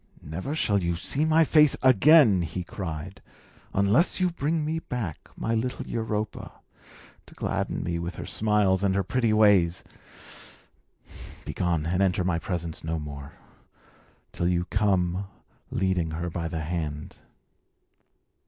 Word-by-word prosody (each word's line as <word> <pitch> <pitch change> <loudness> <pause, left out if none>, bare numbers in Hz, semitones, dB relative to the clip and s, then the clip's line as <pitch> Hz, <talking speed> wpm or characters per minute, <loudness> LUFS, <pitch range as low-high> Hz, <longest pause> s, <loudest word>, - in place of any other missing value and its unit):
"Never 90 - -4
shall 100 -10 +1
you 85 -1 -1
see 135 - -1
my 160 +1 +5
face 150 -2 +4
again," 130 - +6
he 85 +2 -4
cried, 90 0 -6 0.5
"unless 105 - +3
you 180 -1 +2
bring 155 0 -1
me 160 +1 -1
back 115 - -5
my 115 - -1
little 120 +3 -2
Europa, 110 -2 -4 0.7
to - - -14
gladden - - -2
me 85 0 -2
with 85 +1 -5
her - - -6
smiles 105 -3 +1
and 95 -1 +2
her 100 - +1
pretty 115 +3 0
ways. 100 -5 +4 1.6
Begone, 85 -3 -1
and 90 +3 0
enter 90 -1 +2
my 90 -2 0
presence 85 -2 -4
no 80 +1 -2
more, 75 -2 -8 1.0
till 85 - -1
you 90 0 +1
come 95 -2 +1 0.4
leading 95 -3 0
her 85 0 -3
by 85 0 -3
the 80 0 -4
hand." 75 -2 -4
95 Hz, 135 wpm, -26 LUFS, 85-110 Hz, 1.6 s, again